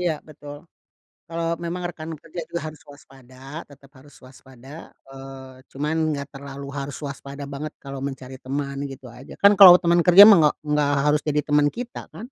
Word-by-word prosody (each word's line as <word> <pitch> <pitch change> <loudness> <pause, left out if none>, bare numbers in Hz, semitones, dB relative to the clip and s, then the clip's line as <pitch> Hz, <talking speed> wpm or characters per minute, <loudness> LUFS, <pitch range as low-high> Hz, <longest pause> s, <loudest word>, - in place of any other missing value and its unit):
iya 175 -2 0 0.2
betul. 145 -1 -11 0.7
Kalo 165 0 -5 0.2
memang 175 +1 -4
rekan 160 0 -9
kerja 165 +3 -9
juga 170 0 -4
harus 155 - -18
waspada, 135 -3 -17 0.3
tetep 140 -1 -19
harus 145 +2 -19
waspada, 130 0 -17 0.4
eee, 135 -1 -12
cuman 150 +3 -3 0.2
nggak 140 0 -6
terlalu 140 0 -9
harus 140 0 -6
waspada 140 0 -8
banget 150 +2 -6
kalo 135 -1 -7
mencari 135 -1 -7
teman 140 +1 -5
gitu 135 -1 -11
aja. 125 +3 -13
Kan 200 0 +7
kalo 185 -3 +11
teman 175 -1 +2
kerja 180 +3 +8
mah 215 -1 +8
nggak 150 -1 +3 0.2
nggak 150 -1 +1
harus 150 0 +2
jadi 150 0 +1
teman 145 0 +2
kita 245 0 -7
kan? 225 - -9
145 Hz, 175 wpm, -22 LUFS, 135-160 Hz, 0.7 s, kalo